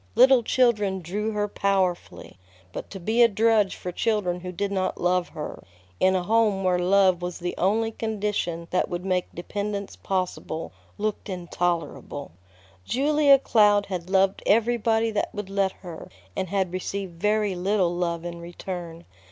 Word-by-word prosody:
Little 260 -1 +7
children 210 -6 +2
drew 210 +6 -2
her 210 0 0
powerfully, 190 - -1 0.3
but - - -6
to 195 - -8
be 220 +7 +1
a 235 - +9
drudge 215 -2 +2
for 180 - -6
children 185 -3 0
who 180 0 -6
did 200 +3 -2
not 190 -1 -1
love 180 0 +1
her, 150 -2 -7 0.4
in 190 0 +4
a 185 - 0
home 210 -1 +2
where 180 -1 +2
love 185 0 +3
was 175 0 -4
the 175 0 -3
only 220 +5 +1
condition 205 -7 -2
that 180 - +1
would 175 +1 -4
make 185 -1 0
dependence 200 +3 -4
possible, 185 -4 -3 0.3
looked 215 0 -3
intolerable. 175 -5 -3 0.5
Julia 285 - +4
Cloud 210 -5 +4
had 180 -2 -5
loved 190 0 +2
everybody 225 0 +2
that 210 - -1
would 205 -2 -5
let 195 -1 +1
her, 170 -3 -8 0.3
and 190 - -2
had 190 -2 -1
received 185 -2 -4
very 210 -1 +2
little 185 -1 +1
love 170 -1 -2
in 170 0 -5
return. 170 -1 -7
195 Hz, 155 wpm, -25 LUFS, 180-210 Hz, 0.5 s, a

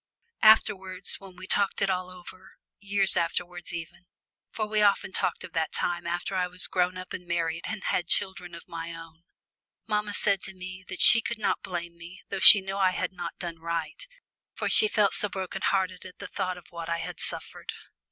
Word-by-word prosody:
Afterwards, 190 -4 +4
when 195 -2 -14
we 185 +1 -10
talked 200 +1 +2
it 195 - +1
all 185 0 -3
over, 185 +1 -13 0.3
years 200 -1 +1
afterwards 175 +1 -3
even, 170 +1 -9 0.4
for 215 - -3
we 215 0 -1
often 200 -2 +2
talked - - -2
of 170 - -11
that 160 -1 -1
time 175 -1 -2
after 175 +3 -3
I 180 -1 0
was 180 0 +1
grown 180 0 -1
up 185 0 -9
and 180 - -8
married, 165 -1 -2
and 220 -3 -6
had 175 - -1
children 180 -2 -1
of 170 - -13
my 165 0 -7
own, 165 0 -13 0.6
mamma 210 -1 -2
said 200 -2 +1
to 195 - -6
me 185 0 -9
that 185 - -3
she 230 - +10
could 235 +1 -4
not 215 - -1
blame 175 -2 -6
me 175 +3 -13
though - - -4
she 200 +1 +11
knew 195 +1 -6
I 190 -2 +2
had - - -2
not 175 -2 -7
done 170 -3 -7
right, 170 - -5 0.5
for - - -3
she 430 - +6
felt 210 - +1
so 205 - +2
broken 190 0 -6
hearted 185 -2 -1
at 185 -1 -13
the - - -9
thought 185 -1 -4
of 175 - -16
what 170 -1 -7
I 170 - -1
had - - -7
suffered. - - -4
185 Hz, 205 wpm, -26 LUFS, 170-195 Hz, 0.6 s, she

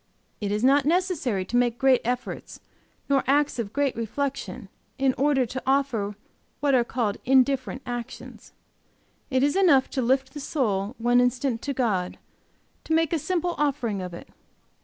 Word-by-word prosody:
"It 205 -2 -2
is 210 +2 -1
not 275 +2 +5
necessary 315 - 0
to 240 - -5
make 240 -1 +2
great 265 -1 +4
efforts 245 +1 -4 0.5
nor 275 -1 +2
acts 285 -1 +2
of 210 -4 -3
great 280 0 0
reflection, 255 -1 -4 0.3
in 265 -1 +2
order 275 -1 +2
to 260 +3 -5
offer 260 -7 +1 0.4
what 285 -1 +1
are 250 -2 +4
called 230 -4 -2
indifferent 260 -2 +2
actions. 240 -1 -7 0.8
It 260 -1 +2
is 285 0 +2
enough 335 -9 +4
to 265 - -1
lift 265 +2 +1
the 295 - -6
soul 225 -7 -1
one 240 +1 +3
instant 245 -1 0
to 280 - -3
God, 205 -9 -1 0.7
to 320 - -1
make 325 0 +2
a 330 - +1
simple 355 +2 -1
offering 260 -9 0
of 180 -1 -5
it. - - -11
260 Hz, 160 wpm, -25 LUFS, 235-280 Hz, 0.8 s, not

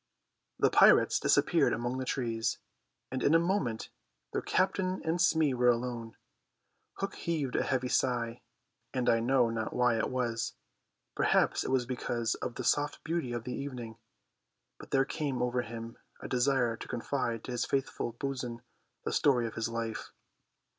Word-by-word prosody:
The - - +3
pirates - - +6
disappeared - - +3
among 120 +2 -2
the 130 - -3
trees, 115 -4 -1 0.5
and 130 0 -2
in 155 - +4
a - - +7
moment 165 - -1 0.4
their - - 0
Captain 185 0 +1
and 165 +2 +1
Smee 160 -5 +3
were 125 0 +3
alone. 120 -1 -2 0.8
Hook 195 - -4
heaved 155 -7 -2
a - - +3
heavy 130 -1 0
sigh, 120 -2 0 0.5
and 125 -1 0
I 115 - +4
know 120 0 +3
not 110 -1 -3
why 125 -2 +3
it - - 0
was, 120 -3 -1 0.6
perhaps - - +2
it - - -3
was 130 -2 +2
because 120 -2 -1
of 125 - -5
the 125 - -4
soft 145 +4 +1
beauty 160 -5 -2
of 120 -1 -3
the 125 - -4
evening, 120 -5 -6 0.8
but - - -11
there 135 0 +3
came 140 -2 -2
over 125 0 +1
him 115 -1 -8 0.2
a - - -7
desire 125 -2 +2
to - - -8
confide 120 -2 -2
to - - -6
his 120 -1 -1
faithful 135 -3 -1
bo'sun 125 -2 -4 0.4
the - - -1
story 125 -5 +3
of 115 - -4
his 110 +1 -2
life. 115 -1 -4
125 Hz, 165 wpm, -31 LUFS, 115-135 Hz, 0.8 s, a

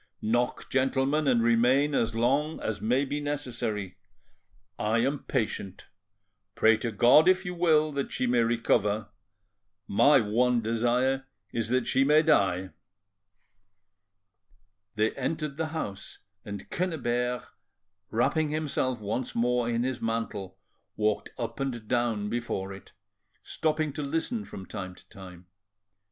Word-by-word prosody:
Knock, 120 +3 -1
gentlemen, 135 +3 +1
and 120 -3 +3
remain 125 +5 +3
as 115 -4 0
long 140 +7 +1
as 105 -2 -3
may 125 +5 +2
be 145 +2 -3
necessary. 120 -10 -4 0.8
I 110 +2 +1
am 135 +3 -1
patient. 105 -6 -3 0.7
Pray 110 0 +5
to 115 +1 -3
God, 120 - +6
if 185 +1 +4
you 180 - -3
will, 160 -3 +3
that 140 -1 -3
she - - -1
may 120 0 +2
recover; 110 -2 +1 0.8
my 120 +8 +5
one 120 +3 +2
desire 120 +4 0 0.3
is 115 -1 -2
that 125 0 +1
she 135 - +2
may 150 +3 +5
die." 95 - +2 2.2
They 110 +1 +2
entered 150 +1 -3
the 160 -1 -1
house, 125 -12 -6 0.3
and 100 -1 -7
Quennebert, 125 -8 -1 0.6
wrapping 150 +7 +1
himself 145 -5 -1
once 110 +4 -3
more 120 0 +1
in 120 0 0
his 130 -1 -3
mantle, 110 -4 -3 0.4
walked 105 0 0
up 115 0 -5
and 120 -5 -3
down 120 -4 0
before 105 -4 -3
it, 95 - -13 0.5
stopping 155 -2 -1
to 150 - -4
listen 165 - -2
from 95 - -9
time 95 -3 -7
to - - -19
time. 90 -2 -12
120 Hz, 130 wpm, -28 LUFS, 110-140 Hz, 2.2 s, God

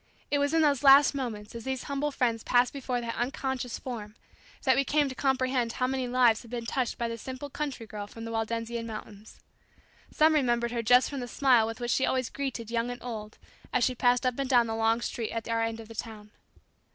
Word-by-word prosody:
It 285 - +2
was 285 0 +1
in 325 0 +3
those 285 -4 +3
last 280 0 +7
moments 230 -6 -5
as 230 -1 -7
these 265 0 -3
humble 280 +1 -1
friends 240 -5 0
passed 245 0 +3
before 255 -3 -2
that 230 -1 -3
unconscious 255 -1 -3
form 215 -5 -7 0.5
that 260 - +4
we 275 - +3
came 290 +1 +2
to - - -5
comprehend 255 -3 0
how 255 - 0
many 260 -1 -1
lives 245 -2 +3
had 235 - -14
been 235 -1 -4
touched 250 +1 -1
by 235 - -1
the 230 0 -5
simple 260 +4 -7
country 280 -6 -4
girl 210 -2 -7
from 225 +2 -9
the 230 - -5
Waldensian 230 +1 -3
mountains. 215 -1 -10 0.7
Some 315 +1 +4
remembered 240 -5 +1
her 240 -1 -1
just 245 +3 +5
from 280 - -5
the 245 - -5
smile 245 -3 +3
with 225 +2 -6
which 240 -1 -2
she 265 - +2
always 255 -2 0
greeted 255 -5 -4
young 235 +1 0
and 245 - -7
old 215 -3 -6 0.3
as 250 - +2
she 255 - +2
passed 245 +1 +2
up 255 +1 0
and 270 -2 -1
down 245 -3 +5
the 225 - -3
long 225 +1 +2
street 230 -2 -3
at 230 -1 -4
our 230 0 0
end 225 0 -2
of 225 - -10
the 225 - -10
town. 215 -2 -7
245 Hz, 230 wpm, -28 LUFS, 230-265 Hz, 0.7 s, last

